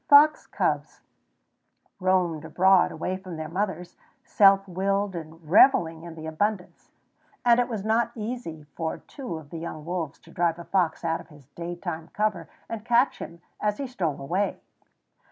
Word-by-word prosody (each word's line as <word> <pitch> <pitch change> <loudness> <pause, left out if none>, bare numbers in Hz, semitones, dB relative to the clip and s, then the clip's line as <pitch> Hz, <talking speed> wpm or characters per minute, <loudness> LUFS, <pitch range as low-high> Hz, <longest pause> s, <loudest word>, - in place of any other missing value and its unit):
Fox 300 +2 +7
cubs - - -1 1.0
roamed 180 -4 +1
abroad 190 +2 +4
away 185 +4 -3
from 185 -3 -8
their 155 0 -4
mothers, 180 0 -3 0.3
self 195 -1 +5
willed 195 +1 0
and 160 -1 -9
reveling 165 - +5
in 170 -1 -9
the 160 -1 -8
abundance; 180 +4 -2 0.6
and 240 0 +6
it 245 0 +1
was 215 -4 -4
now 225 +2 +2
easy 215 -9 -5
for 160 -1 -2
two 255 - -7
of 150 -2 -12
the 165 - -5
young 155 -2 -6
wolves 170 -4 -3
to 165 - -18
drive 170 -1 +1
a 170 - -8
fox 175 -3 0
out 165 0 0
of - - -16
his 150 -4 -17
daytime 170 0 -6
cover 205 -6 -1 0.2
and 225 -2 -5
catch 240 +3 +3
him 170 +1 -9 0.2
as 210 0 0
he 280 - -3
stole 185 - -2
away. 180 +9 -1
180 Hz, 165 wpm, -26 LUFS, 165-210 Hz, 1.0 s, Fox